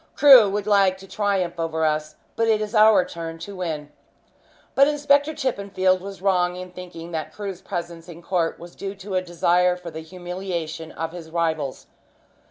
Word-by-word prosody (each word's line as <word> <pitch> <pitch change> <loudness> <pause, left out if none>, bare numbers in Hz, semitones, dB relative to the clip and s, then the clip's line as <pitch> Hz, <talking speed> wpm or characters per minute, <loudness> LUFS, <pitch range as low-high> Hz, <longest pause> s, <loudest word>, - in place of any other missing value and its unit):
Crewe 260 -8 +8
would 205 +1 -2
like 195 -3 +3
to 195 0 -13
triumph 195 -4 -1
over 160 -1 -1
us, 155 0 -1 0.2
but 230 - +1
it 220 -1 +3
is 215 0 -4
our 215 -4 +6
turn 165 -1 -7
to 195 +5 -8
win." 155 -5 -4 0.8
But 275 +1 +5
Inspector 290 0 +2
Chippenfield 200 -9 0
was 195 -1 -9
wrong 180 -2 +2
in 180 0 -8
thinking 175 -2 -9
that 160 -2 -4
Crewe's 195 -3 -6
presence 170 -2 -6
in 170 0 -11
court 170 -3 0
was 170 0 -12
due 195 0 -5
to 195 0 -8
a 185 - +2
desire 180 0 +2
for 175 -2 -9
the 160 - -7
humiliation 175 -2 -5
of 165 0 -4
his 170 -2 -9
rivals. 160 -4 -2
180 Hz, 180 wpm, -23 LUFS, 165-200 Hz, 0.8 s, Crewe